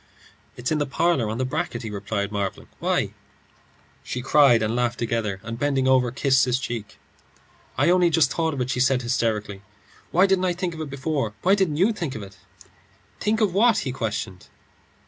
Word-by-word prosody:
"It's 125 +4 -3
in 155 - +1
the 145 - -1
parlour, 140 -5 +1
on 110 - -3
the 130 - -1
bracket," 120 -2 -3
he 110 - -5
replied, 100 0 -3
marvelling. 100 -2 -4
"Why?" - - 0 0.9
She 125 - -5
cried 135 -5 +5
and 110 +2 -1
laughed 120 0 0
together, 115 -4 -2
and 115 +1 -6
bending 135 -2 +1
over, 130 -2 +4
kissed 135 +2 +2
his 125 0 +1
cheek. 115 -5 -6 0.8
"I 170 - +4
only 180 -1 +4
just 155 -5 +3
thought 160 -2 -1
of 130 - -3
it," 125 +1 -1
she - - -2
said, 125 0 +2
hysterically. 110 -5 -1 0.5
"Why 185 +3 +4
didn't 190 -1 +2
I 180 - +1
think 175 0 -3
of 160 - -7
it 155 - -5
before? 140 -5 -2
Why 190 - +4
didn't 190 -7 +1
you 200 +7 +3
think 165 -10 -4
of 110 - -6
it?" 95 -1 -12 0.8
"Think 220 +2 0
of 205 -5 +2
what?" 225 +3 +4
he 130 - -2
questioned. 105 -6 -4
130 Hz, 195 wpm, -24 LUFS, 115-165 Hz, 0.9 s, cried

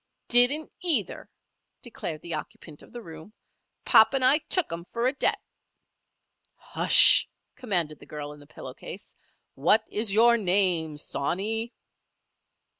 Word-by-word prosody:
"Didn't 250 +6 +3
either!" 310 - -2 0.5
declared 170 -9 -8
the 170 - -6
occupant 155 0 -9
of - - -18
the 240 -1 -10
room. 160 +4 -13 0.5
"Pop 220 +4 +4
and 260 -1 0
I 275 +4 +3
took 345 - -1
'em 170 +1 -8
for 235 +1 -3
a 260 - 0
debt." - - -1 1.2
"Hush!" - - +4 0.3
commanded 175 - -3
the - - -16
girl 150 -1 -8
in 150 - -16
the 145 - -18
pillow - - -11
case. - - -12 0.4
"What 195 +10 +1
is 210 0 0
your 235 +3 +4
name, 180 -6 0
sawney?" 200 - -4
205 Hz, 135 wpm, -25 LUFS, 160-240 Hz, 1.2 s, Pop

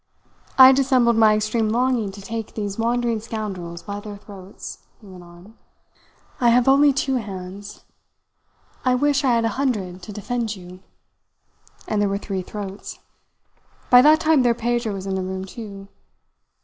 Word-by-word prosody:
"I 260 0 +10
dissembled 260 -3 +3
my 220 -1 +5
extreme 215 +1 0
longing 240 -2 0
to 200 0 -11
take 225 +1 -6
these 205 -1 -4
wandering 235 0 0
scoundrels 195 -7 -6
by 205 0 -5
their 205 0 -9
throats," 200 -1 -11 0.2
he 215 - -18
went 185 -2 -12
on. 175 +4 -16 0.9
"I 240 - +4
have 240 +1 +3
only 280 +2 +6
two 270 -1 0
hands 200 -2 -8 1.0
I 255 -1 +2
wish 285 +2 +1
I 250 -3 +3
had 230 -1 +1
a - - +2
hundred 190 -9 -2
to 210 - -9
defend 225 +1 -3
you 180 -1 -12 1.1
and 210 -1 0
there 205 - +1
were 200 - -1
three 195 -2 -4
throats. 200 +1 -8 0.9
By 245 0 +9
that 305 +3 +6
time 315 -3 +3
their 240 -2 +2
Pedro 240 -2 -1
was 190 0 -7
in 195 - -3
the 190 - -1
room 190 0 -4
too. 200 -1 -9
215 Hz, 160 wpm, -22 LUFS, 195-245 Hz, 1.1 s, I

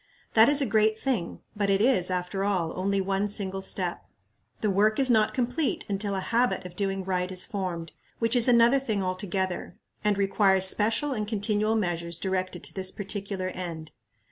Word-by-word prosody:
That 225 +2 +6
is 290 0 +6
a - - 0
great 215 -1 +2
thing, 230 -11 -2
but 205 -1 0
it 195 0 +3
is, 220 -6 +3
after 185 +2 -2
all, 185 -5 -1
only 195 +2 0
one 195 +1 0
single 195 -2 -2
step. 185 -2 -2 0.6
The 215 - +1
work 210 +3 +2
is 265 -2 +4
not 215 -2 +2
complete 255 +4 -1
until 200 0 -2
a 190 - -2
habit 235 -1 0
of 180 -1 -9
doing 195 0 -2
right 180 -1 -1
is 185 -1 +2
formed, 180 -6 -4 0.3
which 230 +1 +1
is 240 0 +5
another 240 +2 +5
thing 220 -7 -2
altogether, 185 -1 -3 0.3
and 210 -1 +1
requires 195 -1 +3
special 225 +9 +1
and 215 -4 -3
continual 215 0 0
measures 170 -5 -1
directed 185 0 -3
to - - -7
this 190 -1 0
particular 195 -2 -3
end. 170 -4 -7
200 Hz, 180 wpm, -27 LUFS, 185-220 Hz, 0.6 s, That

